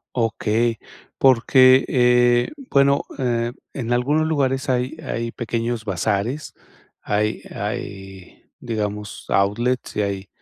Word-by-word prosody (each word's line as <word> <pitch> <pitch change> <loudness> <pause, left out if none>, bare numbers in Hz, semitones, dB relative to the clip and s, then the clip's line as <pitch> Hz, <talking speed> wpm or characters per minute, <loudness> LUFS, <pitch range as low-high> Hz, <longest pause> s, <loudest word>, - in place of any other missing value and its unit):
Okey. 115 -1 0 0.4
Porque, 130 +1 +5
eh, 120 -1 +3 0.2
bueno, 140 0 +4 0.2
eh, 120 -2 0 0.2
en 120 -2 -3
algunos 145 +6 +1
lugares 135 -4 0
hay 125 +3 0
hay 115 -5 -4
pequeños 115 -1 -3
bazares, 105 - -2 0.5
hay 105 +1 -1
hay, 95 -2 -7 0.2
digamos, 105 -3 -4
outlets 120 +6 0
y 105 - +1
hay 100 -1 -3
120 Hz, 105 wpm, -21 LUFS, 105-130 Hz, 0.5 s, Porque